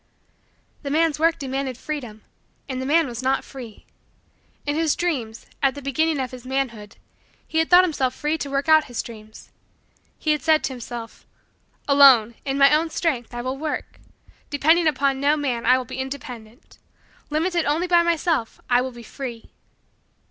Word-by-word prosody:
The 280 - -5
man's 315 +1 +1
work 330 +1 +3
demanded 265 -2 -3
freedom 250 -8 -6 0.4
and 260 -2 -4
the 260 - -4
man 325 +3 +4
was 240 -2 -6
not 265 +1 +1
free. 245 -6 -11 0.8
In 290 0 -1
his 320 -1 +1
dreams, 250 -11 -3 0.2
at 275 0 +2
the 285 - -7
beginning 310 +3 0
of 255 -2 -3
his 250 -2 -10
manhood, 255 -6 -3 0.5
he 320 - 0
had 320 - +1
thought 360 +1 +8
himself 270 -7 -1
free 300 +1 -1
to 285 - -4
work 275 +2 -1
out 315 -1 +6
his 245 -3 -7
dreams. 220 -2 -12 0.7
He 310 - 0
had 300 - 0
said 315 -1 +3
to 265 - -2
himself: 240 -2 -8 0.6
"Alone, 270 -6 +6
in 270 0 -1
my 280 +1 +6
own 320 +2 +2
strength, 300 -9 -2
I 240 - -4
will 260 +2 -3
work. 310 0 -4 0.5
Depending 320 +4 +3
upon 275 -2 +1
no 290 +2 +2
man, 255 -5 -2
I 255 +1 +6
will 255 - -4
be 260 +2 -7
independent. 250 -2 -8 0.5
Limited 335 +2 0
only 305 +5 +1
by 350 -1 +4
myself, 335 -7 0
I 245 0 +5
will 260 - -3
be 240 0 -11
free." 235 -1 -8
275 Hz, 175 wpm, -23 LUFS, 250-310 Hz, 0.8 s, thought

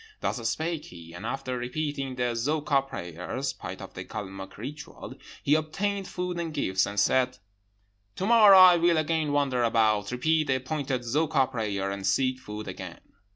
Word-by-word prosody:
Thus 115 -3 -1
spake 160 -1 -2
he, 85 -1 -12
and 95 +6 -6
after 130 -1 -3
repeating 135 +1 -3
the 125 -1 0
Zoka 145 +3 +1
prayers 130 - -5
(part - - -8
of - - -10
the - - -6
Calmuc 95 -2 -7
ritual), 145 +7 -8 0.3
he 145 - +3
obtained 195 +6 -1
food 180 -1 -4
and 165 -2 -3
gifts, 95 -10 0
and 100 0 -2
said, 130 -1 +2 0.8
'To 190 - -2
morrow 215 -3 +8
I 185 -2 +9
will 170 0 +3
again 155 -1 0
wander 140 -3 +1
around, 110 -3 +2
repeat 155 +5 +1
the 135 - +2
appointed 130 0 -2
Zoka 140 +2 +2
prayers, 100 -5 -2
and 100 -1 -4
seek 130 -1 +1
food 105 -3 -7
again.' - - -8
130 Hz, 165 wpm, -27 LUFS, 115-155 Hz, 0.8 s, I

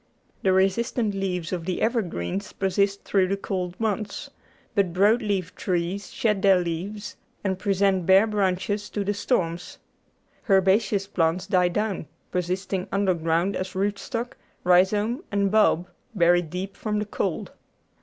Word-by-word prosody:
The 190 - +3
resistant 205 +4 +1
leaves 185 -3 -2
of 170 -2 -3
the 185 0 -2
evergreens 200 - -1
persist 200 +1 0
through 190 -2 +2
the 195 +1 -1
cold 180 -2 -4
months, 215 -2 -2 0.4
but 195 -5 +1
broad 205 +6 +4
leaved 195 -5 -2
trees 180 +2 -2
shed 215 -6 0
their 195 -2 +6
leaves 180 +5 -4 0.3
and 190 -2 -1
present 195 -3 +1
bare 190 +3 +7
branches 205 0 -1
to 205 - -2
the 205 +1 0
storms; 180 -5 -1 0.7
herbaceous 195 +1 +3
plants 180 -1 0
die 185 -2 +3
down, 205 -3 -2 0.2
persisting 185 +1 -2
underground 180 -1 +1
as 185 +1 -4
root 200 +2 0
stock, 240 -1 -4 0.3
rhizome, 205 - +3
and 200 -1 +1
bulb, 205 -5 +3 0.3
buried 175 -2 +3
deep 185 +4 -5
from 210 -1 -2
the 210 - -1
cold. 205 - -3
195 Hz, 140 wpm, -25 LUFS, 180-205 Hz, 0.7 s, bare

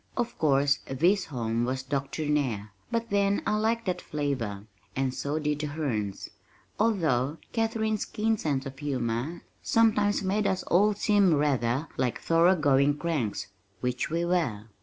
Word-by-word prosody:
Of 240 -1 -1
course 140 -1 +3
this 180 +9 +2
home 115 -4 -2
was 130 +2 -2
doctrinaire, 140 -5 -1 0.2
but 230 0 -2
then 200 0 +2
I 210 - +1
liked 230 +2 0
that 180 -2 -1
flavor, 125 -9 -3 0.3
and 130 -1 0
so 140 +3 -2
did 150 -1 -1
the 150 - -2
Hernes, 120 -10 -3 0.5
although 160 - +1 0.2
Katharine's 220 -2 0
keen 220 +1 0
sense 145 -8 -2
of 135 0 -8
humor 130 +2 -2 0.2
sometimes 210 -3 +3
made 200 +2 +1
us 190 - 0
all 205 +4 +3
seem 200 -4 +3
rather 140 -1 +1
like 125 -2 0
thorough 170 +3 +4
going 145 -2 +3
cranks 120 -12 -2 0.3
which 125 0 -1
we 170 +2 0
were. 160 - 0
150 Hz, 145 wpm, -28 LUFS, 130-195 Hz, 0.5 s, thorough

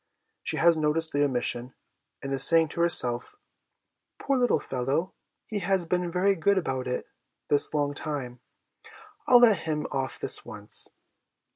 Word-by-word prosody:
She - - -1
has 170 -1 +3
noticed 155 +1 +1
the 145 0 +1
omission, 125 -2 -1 0.5
and 135 0 -4
is 135 0 +3
saying 165 +1 +6
to 170 - -4
herself, 125 - +2 0.4
' - - -56
Poor 275 - -1
little 250 -2 +1
fellow, 135 +7 -3 0.3
he 215 -3 -4
has 190 -1 0
been 180 +1 -2
very 185 +3 +2
good 200 +4 +1
about 130 -7 -3
it 125 - -3 0.4
this 145 - +3
long 145 -2 -1
time; 135 -5 -5 0.9
I'll 245 -1 +6
let 225 -5 +5
him 150 -2 -3
off 135 -2 -3
this - - -1
once.' - - -3
155 Hz, 155 wpm, -26 LUFS, 135-180 Hz, 0.9 s, saying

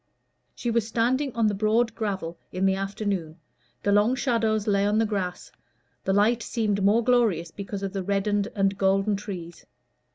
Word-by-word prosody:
She 240 - -2
was 225 -2 +1
standing 255 +5 +1
on 230 -1 +2
the 210 - +2
broad 220 +3 +1
gravel 190 -7 -4
in 185 +1 -1
the 190 - +4
afternoon; 195 -4 -3 0.5
the 205 - +2
long 210 +5 +4
shadows 225 -5 0
lay 200 -2 +2
on 205 +1 +2
the 225 - +3
grass; 195 -4 -3 0.5
the - - +1
light 215 +4 +3
seemed 215 -4 -1
the - - -3
more 210 +4 +4
glorious 215 -10 +2
because 200 +1 -6
of 195 0 -3
the 195 - -2
reddened 200 +1 0
and 195 -1 +1
golden 195 +2 +2
trees. 180 -4 -7
205 Hz, 175 wpm, -26 LUFS, 195-225 Hz, 0.5 s, the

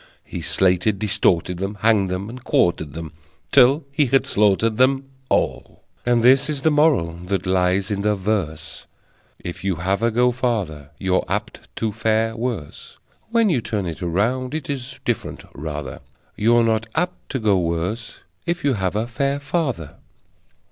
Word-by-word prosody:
He - - -6
slated, 95 +2 +2
distorted 90 -3 +1
them, 95 +3 -3
Hanged 105 -4 +3
them 90 +2 -3
and 120 +2 -9
quartered 80 -4 +1
them, 80 -1 -6 0.4
Till 135 +3 +5
he 145 0 +2
had 135 +2 +3
slaughtered 105 +2 +2
them 135 +2 +3 0.3
All. - - -1 0.2
And 120 -1 +3
this 135 +4 +5
is 145 -3 -3
The 160 - +4
Moral 145 - +3
that 95 -1 -1
lies 95 +2 +1
in 100 -1 -1
the 105 +1 +2
verse: 85 -6 -3 0.5
If 85 - -7
you 95 -2 0
have 95 +5 -1
a 115 - +3
go 125 +2 +3
farther, 100 - -2
you're 95 -1 +1
apt - - -4
to 110 -1 -1
fare 110 +1 0
worse. 115 - -5 0.3
(When 230 -3 +3
you 130 -7 +1
turn 105 -3 -2
it 85 -3 -5
around 120 - 0
it 155 -1 -3
is 130 -3 -6
different - - -2
rather: 75 -2 -6 0.4
You're 115 +2 +4
not 115 0 +1
apt 180 +2 -2
to 130 - 0
go 105 -4 +3
worse 90 +7 -3 0.3
if 170 0 -1
you 140 -2 +3
have 95 -3 -1
a 110 +2 0
fair 140 +4 -1
father!) 135 - -2
110 Hz, 165 wpm, -22 LUFS, 90-125 Hz, 0.5 s, Till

